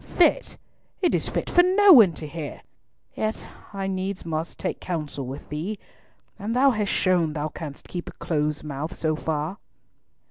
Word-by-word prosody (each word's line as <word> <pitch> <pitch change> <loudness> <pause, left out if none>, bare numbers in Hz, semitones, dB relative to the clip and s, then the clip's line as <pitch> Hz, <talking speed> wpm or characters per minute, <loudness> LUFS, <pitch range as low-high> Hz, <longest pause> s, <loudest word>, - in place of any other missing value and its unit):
"Fit! - - +3 0.4
It 355 - +2
is - - 0
fit - - -2
for 355 - +6
no 380 +2 +7
one 215 - +8
to 155 - -7
hear! 150 -1 -7 0.5
Yet 215 0 -3 0.2
I 195 -1 -4
needs 190 0 -3
must 160 0 -3
take - - -3
counsel 150 -6 -4
with 135 +2 -7
thee, 170 +8 -3 0.6
and 220 +3 -2
thou 270 +2 +5
hast 210 -4 -1
shown 175 -5 +2
thou 150 0 -2
canst 150 -3 -8
keep 175 -1 -5
a - - -11
close 150 -2 -1
mouth 150 +3 -5
so 155 -1 0
far." 160 +5 -3
170 Hz, 170 wpm, -25 LUFS, 155-210 Hz, 0.6 s, one